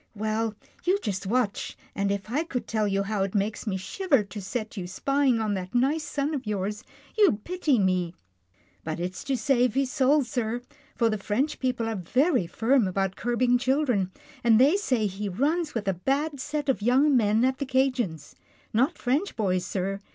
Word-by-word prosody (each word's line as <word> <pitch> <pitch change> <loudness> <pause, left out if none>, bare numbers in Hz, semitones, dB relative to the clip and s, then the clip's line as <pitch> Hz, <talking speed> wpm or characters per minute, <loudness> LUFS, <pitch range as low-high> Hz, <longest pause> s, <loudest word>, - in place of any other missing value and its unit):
Well, 220 +1 -1 0.3
you 370 +2 +3
just 195 -3 -3
watch, 230 -1 -1 0.2
and 200 0 0
if 200 +2 -3
I 295 +6 +1
could 265 -7 -4
tell 215 -2 0
you 195 0 +1
how 205 0 -2
it 195 +1 -1
makes 210 +3 -1
me 190 -2 0
shiver 275 - +1
to 205 +1 -8
set 215 +3 -4
you 185 -4 -4
spying 275 +4 +1
on 215 -2 0
that 185 +2 -5
nice 280 +6 +2
son 290 +1 -2
of 265 -6 -4
yours, 210 0 -2 0.3
you'd 380 - +3
pity 345 -7 +1
me. 185 -3 +1 0.7
But 160 +1 -4
it's 180 +2 -4
to 275 -2 0
save 250 0 +2
his 270 -1 +1
soul, 285 +1 +3
sir, 240 -2 -2 0.3
for 230 -2 +2
the 215 - -2
French 260 +10 -1
people 250 -3 -1
are 225 - -2
very 250 - +1
firm 230 +3 +2
about 190 0 -1
curbing 245 +1 +1
children, 255 -8 +1 0.3
and 230 -2 +5
they 280 +8 +6
say 255 - +1
he 200 +1 -3
runs 295 - 0
with 210 -3 -2
a 195 - +3
bad 275 - -1
set 290 +2 -3
of 265 -5 +1
young 265 +6 +4
men 220 0 +3
at 260 0 0
the 280 - -1
'Cajien's. 255 - 0 0.4
Not 260 +10 +2
French 280 +11 0
boys, 185 -5 0
sir. 195 +1 -2
230 Hz, 190 wpm, -26 LUFS, 200-270 Hz, 0.7 s, they